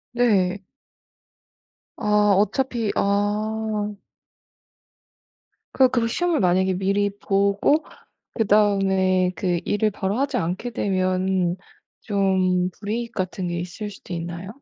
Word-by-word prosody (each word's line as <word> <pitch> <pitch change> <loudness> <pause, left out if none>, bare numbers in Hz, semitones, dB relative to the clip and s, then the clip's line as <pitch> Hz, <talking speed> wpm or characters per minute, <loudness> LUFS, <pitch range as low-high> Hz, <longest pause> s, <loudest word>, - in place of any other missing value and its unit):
네. 200 -5 +2 1.3
아. 210 -1 +3
어차피 230 +1 0
아. 210 +1 -1 1.8
그 260 -1 +5
그래서 235 -2 +1
시험을 345 +6 0
만약에 185 +1 +2
미리 200 +2 +1
보고 200 +10 +2 0.5
그다음에 195 -4 +2
그 175 -3 0
일을 210 +1 +1
바로 195 +1 -2
하지 275 -1 0
않게 190 +6 -3
되면 185 -3 0 0.4
좀 185 -3 +1
불이익 230 +3 -3
같은 185 -1 -3
게 175 - -3
있을 195 +4 -6
수도 190 -2 -9
있나요? 170 +2 -6
200 Hz, 200 characters per minute, -23 LUFS, 185-215 Hz, 1.8 s, 그